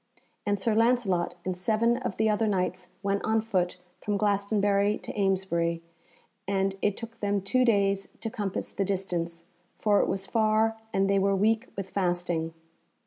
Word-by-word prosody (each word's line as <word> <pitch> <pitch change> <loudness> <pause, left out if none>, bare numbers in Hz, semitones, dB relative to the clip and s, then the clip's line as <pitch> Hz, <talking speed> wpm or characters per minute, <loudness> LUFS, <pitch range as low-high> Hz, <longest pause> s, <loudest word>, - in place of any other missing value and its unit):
And 205 0 +2
Sir 220 +3 +1
Lancelot 225 -6 +2
and 185 -1 -1
seven 225 +5 +2
of 250 -6 -4
the 220 - +2
other 215 +1 +2
Knights 185 -2 -1 0.2
went 200 0 0
on 220 0 +2
foot 185 -5 -1 0.2
from 205 -1 -1
Glastonbury 205 0 +2
to - - -8
Amesbury, 185 -4 0 0.6
and 195 0 +1
it 205 -1 +1
took 230 -1 -8
them 205 -1 +1
two 255 +7 +2
days 200 -4 +2
to 225 - -4
compass 200 -3 -3
the 195 - -1
distance, 175 -3 -2 0.3
for 205 -2 +3
it - - +2
was 195 0 -1
far 220 +1 +2 0.2
and 195 0 +2
they 195 0 +3
were 195 0 +2
weak 220 +5 +2
with 195 -1 -3
fasting. 175 -3 -1
200 Hz, 165 wpm, -28 LUFS, 185-215 Hz, 0.6 s, for